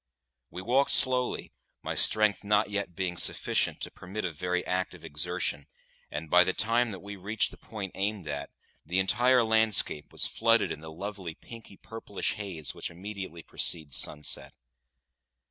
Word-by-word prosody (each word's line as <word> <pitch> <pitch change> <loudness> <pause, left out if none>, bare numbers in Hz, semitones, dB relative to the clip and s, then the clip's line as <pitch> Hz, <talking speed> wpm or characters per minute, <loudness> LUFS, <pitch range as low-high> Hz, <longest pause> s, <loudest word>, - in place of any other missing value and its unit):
We 90 - -8
walked 130 +6 +2
slowly, 125 -1 +4 0.3
my - - -3
strength 105 -1 +5
not 105 0 +2
yet 100 -4 -3
being 90 -1 -2
sufficient - - +2
to - - -3
permit 100 +4 -6
of 80 - -4
very 90 +2 -2
active 90 -2 -3
exertion, 75 -1 -3 0.4
and 75 +2 -6
by 90 +3 +6
the 95 - -1
time 115 +2 +1
that 95 -4 -7
we 100 0 -8
reached 100 +3 -1
the - - -13
point 100 -4 -7
aimed 100 -3 -3
at, 70 -1 -5 0.3
the 85 +4 -3
entire 120 +6 +3
landscape 110 -8 +3
was - - -1
flooded 115 0 +2
in - - -6
the 80 0 -9
lovely 95 -1 -6
pinky 115 -4 -12
purplish 110 -3 -5
haze 90 -9 -4
which - - -5
immediately 95 -2 -8
precedes 80 -5 -1
sunset. 75 0 0
95 Hz, 160 wpm, -28 LUFS, 85-110 Hz, 0.4 s, by